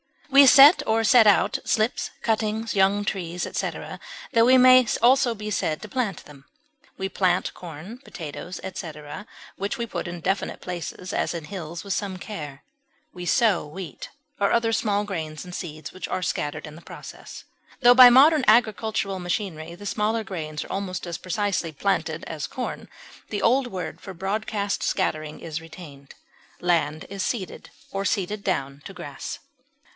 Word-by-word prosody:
We 275 Hz, 0 st, +8 dB
set 280 Hz, +5 st, +9 dB
or 225 Hz, +1 st, +2 dB
set 225 Hz, 0 st, +6 dB
out 205 Hz, 0 st, +4 dB
slips, 220 Hz, +2 st, 0 dB
cuttings, 220 Hz, 0 st, -1 dB
young 200 Hz, +1 st, +2 dB
trees, 180 Hz, -4 st, -3 dB
etc., -, -, -4 dB, 0.3 s
tho 230 Hz, 0 st, +5 dB
we 260 Hz, +1 st, +6 dB
may 255 Hz, -1 st, +7 dB
also 245 Hz, 0 st, +4 dB
be 210 Hz, 0 st, -6 dB
said 155 Hz, -5 st, -1 dB
to 215 Hz, -, -8 dB
plant 220 Hz, -6 st, -2 dB
them; 140 Hz, -2 st, -15 dB, 0.5 s
we 190 Hz, -, -2 dB
plant 185 Hz, -2 st, 0 dB
corn, 175 Hz, +7 st, -9 dB
potatoes, 175 Hz, -, -8 dB
etc., 155 Hz, 0 st, -7 dB, 0.3 s
which 200 Hz, +2 st, -3 dB
we 235 Hz, -, -2 dB
put 220 Hz, -, -5 dB
in 175 Hz, 0 st, -6 dB
definite 190 Hz, +3 st, -2 dB
places, 180 Hz, 0 st, -6 dB
as -, -, -1 dB
in 165 Hz, -, -5 dB
hills, 170 Hz, -1 st, -7 dB
with 200 Hz, -1 st, -2 dB
some 195 Hz, -2 st, -3 dB
care; 150 Hz, -9 st, -8 dB, 0.5 s
we 180 Hz, -1 st, -7 dB
sow 215 Hz, -, +2 dB
wheat 155 Hz, -5 st, -8 dB, 0.3 s
or 200 Hz, -, +2 dB
other 230 Hz, -1 st, +2 dB
small 205 Hz, -2 st, +1 dB
grains 160 Hz, -6 st, -5 dB
and 180 Hz, -, -10 dB
seeds 155 Hz, -4 st, -6 dB
which 185 Hz, -, -6 dB
are 185 Hz, 0 st, -3 dB
scattered 150 Hz, -1 st, -2 dB
in 150 Hz, -1 st, -10 dB
the 165 Hz, -, -12 dB
process. -, -, -10 dB, 0.4 s
Tho 245 Hz, -1 st, +8 dB
by 250 Hz, 0 st, +10 dB
modern 280 Hz, +4 st, +6 dB
agricultural 215 Hz, -3 st, +2 dB
machinery 170 Hz, -3 st, -4 dB
the 205 Hz, +3 st, -11 dB
smaller 215 Hz, +2 st, 0 dB
grains 155 Hz, -6 st, -5 dB
are -, -, -10 dB
almost 190 Hz, -2 st, -3 dB
as 170 Hz, -1 st, -5 dB
precisely 185 Hz, -3 st, -1 dB
planted 160 Hz, -1 st, -1 dB
as 155 Hz, -3 st, -5 dB
corn, 255 Hz, -, -5 dB, 0.4 s
the 205 Hz, -, -3 dB
old 255 Hz, +2 st, +3 dB
word 185 Hz, -6 st, -6 dB
for 190 Hz, -2 st, -9 dB
broadcast 200 Hz, +2 st, -2 dB
scattering 155 Hz, 0 st, -1 dB
is 160 Hz, -1 st, -5 dB
retained. 155 Hz, -4 st, -12 dB, 0.4 s
Land 160 Hz, -3 st, 0 dB
is 200 Hz, 0 st, -5 dB
seeded 195 Hz, -4 st, -4 dB, 0.2 s
or 195 Hz, 0 st, -2 dB
seeded 200 Hz, 0 st, -1 dB
down 140 Hz, -7 st, -2 dB
to 195 Hz, -, -8 dB
grass. 145 Hz, -7 st, -7 dB
190 Hz, 165 wpm, -24 LUFS, 165-220 Hz, 0.5 s, by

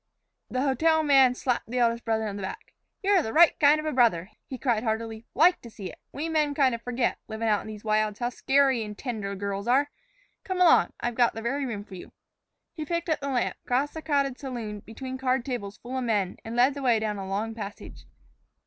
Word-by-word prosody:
The 255 Hz, +1 st, -1 dB
hotel 315 Hz, +4 st, +2 dB
man 270 Hz, -4 st, +5 dB
slapped 250 Hz, -1 st, -1 dB
the 250 Hz, -, -3 dB
eldest 235 Hz, -1 st, +1 dB
brother 220 Hz, -1 st, 0 dB
on 200 Hz, -, -4 dB
the 200 Hz, -, -6 dB
back. 190 Hz, -, -7 dB, 0.3 s
"You're 390 Hz, -2 st, +4 dB
the 220 Hz, -, -4 dB
right 335 Hz, +1 st, +7 dB
kind 295 Hz, 0 st, +5 dB
of 305 Hz, -, -5 dB
a 310 Hz, -, 0 dB
brother," 220 Hz, -, +2 dB, 0.2 s
he 260 Hz, -, -6 dB
cried 240 Hz, -5 st, 0 dB
heartily; 225 Hz, 0 st, -3 dB
"like 345 Hz, +6 st, +5 dB
to 235 Hz, -, -10 dB
see 195 Hz, -4 st, -8 dB
it. -, -, -16 dB
We 300 Hz, +3 st, -4 dB
men 305 Hz, -3 st, +1 dB
kind 270 Hz, -4 st, +3 dB
o' 235 Hz, -, -3 dB
forget, 245 Hz, +1 st, -1 dB
living 225 Hz, +1 st, -3 dB
out 210 Hz, -2 st, +2 dB
in -, -, -11 dB
these 215 Hz, -1 st, -8 dB
wilds, 215 Hz, -1 st, +1 dB
how 240 Hz, -, -1 dB
scarey 265 Hz, -1 st, +2 dB
and 210 Hz, -1 st, -8 dB
tender 210 Hz, -6 st, -4 dB
girls 200 Hz, +1 st, -4 dB
are. 275 Hz, +4 st, +3 dB, 0.5 s
Come 375 Hz, -1 st, -3 dB
along, 360 Hz, -2 st, +5 dB
I've 240 Hz, -, -1 dB
got 235 Hz, -1 st, +2 dB
the 225 Hz, -, -5 dB
very 270 Hz, +3 st, -1 dB
room 210 Hz, -4 st, -4 dB
for 205 Hz, -, -15 dB
you." 180 Hz, -, -10 dB, 0.6 s
He 315 Hz, -, -5 dB
picked 335 Hz, +2 st, -3 dB
up 315 Hz, -, +1 dB
the 280 Hz, -, -4 dB
lamp, 250 Hz, -3 st, -1 dB
crossed 270 Hz, +4 st, 0 dB
the 320 Hz, -, -6 dB
crowded 280 Hz, -4 st, 0 dB
saloon, 235 Hz, -6 st, -5 dB
between 260 Hz, +5 st, -7 dB
card 255 Hz, -2 st, 0 dB
tables 235 Hz, -5 st, -4 dB
full 250 Hz, +2 st, -7 dB
of 260 Hz, -, -1 dB
men, 205 Hz, -6 st, 0 dB
and 225 Hz, +1 st, -6 dB
led 250 Hz, +3 st, +4 dB
the 280 Hz, -, -7 dB
way 245 Hz, -4 st, +3 dB
down 215 Hz, -2 st, -2 dB
a 190 Hz, -, -5 dB
long 210 Hz, +4 st, -2 dB
passage. 205 Hz, -2 st, -9 dB
245 Hz, 230 wpm, -27 LUFS, 220-280 Hz, 0.6 s, right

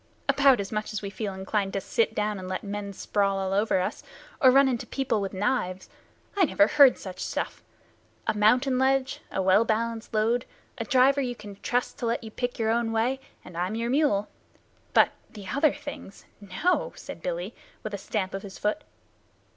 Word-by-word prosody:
"About 275 Hz, -4 st, +5 dB
as 200 Hz, -1 st, -4 dB
much 215 Hz, 0 st, -3 dB
as 210 Hz, -, -4 dB
we 200 Hz, -, -4 dB
feel 205 Hz, 0 st, -4 dB
inclined 195 Hz, +1 st, -2 dB
to 195 Hz, -, 0 dB
sit 220 Hz, +3 st, 0 dB
down 210 Hz, -1 st, -1 dB
and 185 Hz, -, -7 dB
let 185 Hz, 0 st, -3 dB
men 205 Hz, 0 st, -4 dB
sprawl 200 Hz, 0 st, 0 dB
all 190 Hz, 0 st, -1 dB
over 205 Hz, -1 st, +2 dB
us, 185 Hz, -, -2 dB, 0.4 s
or 260 Hz, -, +8 dB
run 270 Hz, +2 st, +6 dB
into 245 Hz, -3 st, -2 dB
people 265 Hz, -6 st, -1 dB
with 195 Hz, -, -3 dB
knives. 190 Hz, -2 st, -1 dB, 0.5 s
I 400 Hz, -, +4 dB
never 200 Hz, -, +4 dB
heard 270 Hz, +4 st, +6 dB
such 185 Hz, -2 st, -8 dB
stuff. -, -, -3 dB, 0.6 s
A -, -, +1 dB
mountain 250 Hz, +5 st, +3 dB
ledge, 265 Hz, 0 st, +1 dB
a 190 Hz, -, -1 dB
well 190 Hz, +4 st, +5 dB
balanced 230 Hz, 0 st, -2 dB
load, 225 Hz, +3 st, +1 dB, 0.3 s
a -, -, -2 dB
driver 270 Hz, +1 st, +4 dB
you 245 Hz, -2 st, -2 dB
can 205 Hz, -3 st, -10 dB
trust 245 Hz, +6 st, -2 dB
to 240 Hz, -, -1 dB
let 230 Hz, +1 st, -1 dB
you 220 Hz, -, -8 dB
pick 245 Hz, +2 st, -3 dB
your 220 Hz, -1 st, +1 dB
own 230 Hz, 0 st, +1 dB
way, 235 Hz, +4 st, +1 dB, 0.3 s
and 180 Hz, -, -11 dB
I'm 180 Hz, +5 st, -1 dB
your 230 Hz, +1 st, -1 dB
mule. 260 Hz, -8 st, +2 dB, 0.7 s
But -, -, +6 dB, 0.2 s
the 205 Hz, -3 st, -10 dB
other 290 Hz, +2 st, +3 dB
things 285 Hz, -9 st, -9 dB, 0.4 s
no!" 360 Hz, +1 st, +2 dB
said -, -, -9 dB
Billy, -, -, -3 dB, 0.3 s
with 215 Hz, -, -5 dB
a 200 Hz, -, -3 dB
stamp 195 Hz, -1 st, -3 dB
of 195 Hz, -, -4 dB
his 195 Hz, -1 st, -9 dB
foot. 210 Hz, +9 st, -1 dB
220 Hz, 195 wpm, -27 LUFS, 200-255 Hz, 0.7 s, or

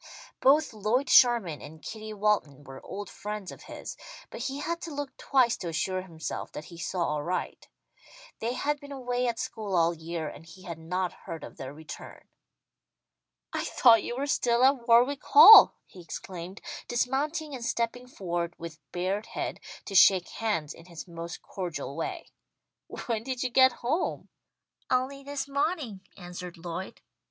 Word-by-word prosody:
Both 290 Hz, 0 st, +4 dB
Lloyd 220 Hz, +6 st, 0 dB
Sherman 230 Hz, -, +5 dB
and 160 Hz, +1 st, -11 dB
Kitty 215 Hz, +4 st, -7 dB
Walton 200 Hz, -10 st, 0 dB
were 135 Hz, -1 st, -11 dB
old 205 Hz, +1 st, -6 dB
friends 210 Hz, -2 st, -6 dB
of -, -, -12 dB
his, -, -, -7 dB, 0.4 s
but -, -, -7 dB
he 265 Hz, +2 st, -3 dB
had 335 Hz, +3 st, -3 dB
to 335 Hz, -, -6 dB
look 285 Hz, -2 st, -5 dB
twice 255 Hz, -4 st, +2 dB
to 175 Hz, -, -6 dB
assure 185 Hz, +3 st, -1 dB
himself 165 Hz, -4 st, -6 dB
that 155 Hz, -, -7 dB
he -, -, -10 dB
saw 170 Hz, -3 st, -1 dB
aright. 170 Hz, +5 st, -3 dB, 0.7 s
They 230 Hz, +2 st, -1 dB
had 290 Hz, +3 st, -1 dB
been 285 Hz, 0 st, -11 dB
away 250 Hz, -2 st, -1 dB
at 235 Hz, -1 st, -1 dB
school 215 Hz, -4 st, -4 dB
all 170 Hz, 0 st, +3 dB
year, 165 Hz, 0 st, -5 dB
and 150 Hz, -, -9 dB
he 185 Hz, +3 st, -14 dB
had 170 Hz, -4 st, -7 dB
not 180 Hz, +3 st, -2 dB
heard 165 Hz, -1 st, -8 dB
of -, -, -10 dB
their 130 Hz, 0 st, -6 dB
return. 150 Hz, +1 st, -10 dB, 1.3 s
"I -, -, -1 dB
thought 230 Hz, -4 st, +5 dB
you 240 Hz, -, -5 dB
were 275 Hz, -, -1 dB
still 245 Hz, -4 st, +2 dB
at 265 Hz, -3 st, +2 dB
Warwick 245 Hz, +5 st, +4 dB
Hall!" 440 Hz, 0 st, +10 dB
he 185 Hz, -, -13 dB
exclaimed, 175 Hz, +3 st, -8 dB, 0.3 s
dismounting 285 Hz, +6 st, -1 dB
and 250 Hz, -3 st, -6 dB
stepping 235 Hz, +2 st, -2 dB
forward 175 Hz, -7 st, -3 dB
with 165 Hz, -1 st, -8 dB
bared 190 Hz, +4 st, -2 dB
head, -, -, -4 dB, 0.3 s
to 200 Hz, -, -7 dB
shake 185 Hz, -1 st, +6 dB
hands 205 Hz, -10 st, -2 dB
in 165 Hz, -, -15 dB
his 170 Hz, 0 st, -9 dB
most 170 Hz, 0 st, -7 dB
cordial 165 Hz, -7 st, -5 dB
way. 360 Hz, -, -5 dB, 0.7 s
"When 230 Hz, -3 st, -1 dB
did 255 Hz, +1 st, -3 dB
you 255 Hz, -, -1 dB
get 260 Hz, +1 st, +6 dB
home?" 310 Hz, +9 st, -1 dB, 0.6 s
"Only 260 Hz, +2 st, 0 dB
this 280 Hz, 0 st, -4 dB
mawning," 280 Hz, -, -1 dB, 0.2 s
answered 180 Hz, -1 st, -8 dB
Lloyd. 170 Hz, +2 st, -6 dB
210 Hz, 165 wpm, -28 LUFS, 170-260 Hz, 1.3 s, Hall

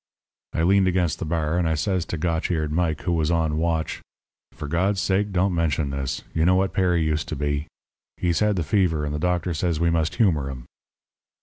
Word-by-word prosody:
"I 80 Hz, -, 0 dB
leaned 95 Hz, +2 st, +4 dB
against 90 Hz, -3 st, +1 dB
the -, -, -3 dB
bar, 80 Hz, +1 st, 0 dB
and 85 Hz, -2 st, +1 dB
I 80 Hz, -, +1 dB
says 90 Hz, +1 st, -1 dB
to 85 Hz, -, -4 dB
Gotch 80 Hz, 0 st, -1 dB
eared 80 Hz, -4 st, -1 dB
Mike, 80 Hz, -2 st, 0 dB
who 90 Hz, -, -1 dB
was 80 Hz, -2 st, +1 dB
on 80 Hz, -2 st, +1 dB
watch: 80 Hz, -1 st, -1 dB, 0.5 s
"'For 75 Hz, -, -7 dB
God's 95 Hz, +6 st, +1 dB
sake 100 Hz, +2 st, +1 dB
don't 95 Hz, 0 st, +1 dB
mention 80 Hz, -4 st, 0 dB
this. 70 Hz, -2 st, -3 dB
You 80 Hz, -, +1 dB
know 90 Hz, +2 st, +4 dB
what 95 Hz, +1 st, +1 dB
Perry 90 Hz, -3 st, +2 dB
used 80 Hz, 0 st, -1 dB
to -, -, -4 dB
be. 75 Hz, +1 st, -2 dB, 0.5 s
He's 85 Hz, -2 st, 0 dB
had 105 Hz, -1 st, +2 dB
the 85 Hz, -, -1 dB
fever, 80 Hz, -4 st, +1 dB
and 75 Hz, -, -3 dB
the 75 Hz, -, -2 dB
doctor 90 Hz, +1 st, 0 dB
says 80 Hz, 0 st, -1 dB
we 85 Hz, 0 st, +2 dB
must 80 Hz, -1 st, 0 dB
humour 80 Hz, -, +2 dB
him.' 65 Hz, -3 st, -8 dB
85 Hz, 215 wpm, -24 LUFS, 75-90 Hz, 0.5 s, leaned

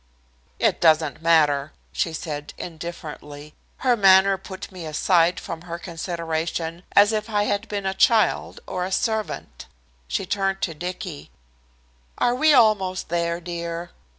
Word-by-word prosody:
"It -, -, +1 dB
doesn't 155 Hz, -3 st, +3 dB
matter," 155 Hz, -3 st, +3 dB, 0.2 s
she 165 Hz, -, -1 dB
said 150 Hz, -2 st, -6 dB
indifferently. 150 Hz, -3 st, -8 dB, 0.3 s
Her 250 Hz, -1 st, +5 dB
manner 195 Hz, -2 st, +6 dB
put 190 Hz, +1 st, -9 dB
me 180 Hz, -4 st, -7 dB
aside 170 Hz, +2 st, +2 dB
from 165 Hz, -1 st, -7 dB
her 170 Hz, -, -3 dB
consideration 165 Hz, -1 st, -4 dB
as 205 Hz, +2 st, +6 dB
if 215 Hz, +1 st, -2 dB
I 205 Hz, -1 st, +1 dB
had 205 Hz, +1 st, -1 dB
been 205 Hz, -1 st, -3 dB
a 190 Hz, -, 0 dB
child 215 Hz, +1 st, +2 dB
or 180 Hz, -1 st, -3 dB
a 185 Hz, -, -4 dB
servant. 220 Hz, +1 st, -2 dB, 0.4 s
She 195 Hz, -, -2 dB
turned 195 Hz, 0 st, -1 dB
to 165 Hz, -, -1 dB
Dicky. 175 Hz, -1 st, -6 dB, 0.9 s
"Are 240 Hz, -, +2 dB
we 310 Hz, +5 st, +4 dB
almost 210 Hz, -8 st, +3 dB
there, 170 Hz, 0 st, -1 dB
dear?" 170 Hz, 0 st, -5 dB
175 Hz, 140 wpm, -23 LUFS, 165-195 Hz, 0.9 s, manner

